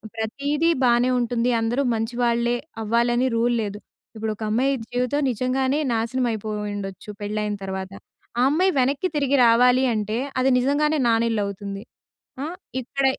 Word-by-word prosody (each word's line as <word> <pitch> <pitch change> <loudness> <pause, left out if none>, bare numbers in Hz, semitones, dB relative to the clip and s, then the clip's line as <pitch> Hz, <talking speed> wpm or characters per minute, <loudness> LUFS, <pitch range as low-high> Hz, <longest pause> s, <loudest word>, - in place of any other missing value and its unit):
ప్రతీదీ 280 +8 0
బానే 240 +1 +4
ఉంటుంది. 240 0 0
అందరూ 240 +5 0
మంచి 225 +2 -3
వాళ్ళే 235 0 +2 0.3
అవ్వాలని 240 +3 +2
రూల్ 240 +1 +2
లేదు. 205 0 -4 0.4
ఇప్పుడు 220 0 -2
ఒక 220 - -7
అమ్మాయి 255 +5 +2 0.2
జీవితం 250 +4 -1
నిజంగానే 260 +3 0
నాశనం 235 +3 0
అయిపోయి 215 -1 -4 0.2
ఉండొచ్చు 195 +1 -7
పెళ్లైన 210 0 -2
తరువాత. 190 0 -5 0.5
ఆ - - +4
అమ్మాయి 370 +6 +3
వెనక్కి 275 +8 +1
తిరిగి 280 -1 +2
రావాలి 250 +3 +5
అంటే, 215 +1 -2 0.2
అది 260 +1 +3
నిజంగానే 295 +4 +2
నానిళ్ళు 225 -1 +2
అవుతుంది. 200 +1 -6 0.6
ఆ! - - -2 0.4
ఇక్కడ 270 +2 -2
235 Hz, 140 wpm, -23 LUFS, 215-260 Hz, 0.6 s, రావాలి